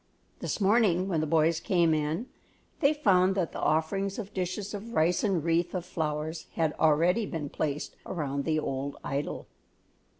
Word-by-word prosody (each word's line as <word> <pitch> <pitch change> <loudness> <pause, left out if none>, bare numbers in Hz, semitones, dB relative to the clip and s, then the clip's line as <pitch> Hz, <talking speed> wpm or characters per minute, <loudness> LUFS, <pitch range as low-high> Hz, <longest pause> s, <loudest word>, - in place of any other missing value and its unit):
This - - -3
morning 195 -3 +3
when 165 -5 0
the 155 - -1
boys 160 +1 +3
came 170 -4 +2
in, 155 +7 -1 0.5
they 280 -2 +4
found 190 -10 +3
that 180 -4 0
the - - -6
offerings 195 +5 0
of 205 -3 -6
dishes 190 +3 -3
of 220 +3 -6
rice 165 +3 +2
and 190 -7 +1
wreaths 170 +2 +1
of 180 -1 -3
flowers 160 -2 -3
had 160 -2 +1
already 170 +7 +3
been 150 -4 -4
placed 150 -1 -3
around 140 -5 -3
the 155 -1 +1
old 140 -1 -3
idol. 140 +1 -3
170 Hz, 165 wpm, -29 LUFS, 155-195 Hz, 0.5 s, they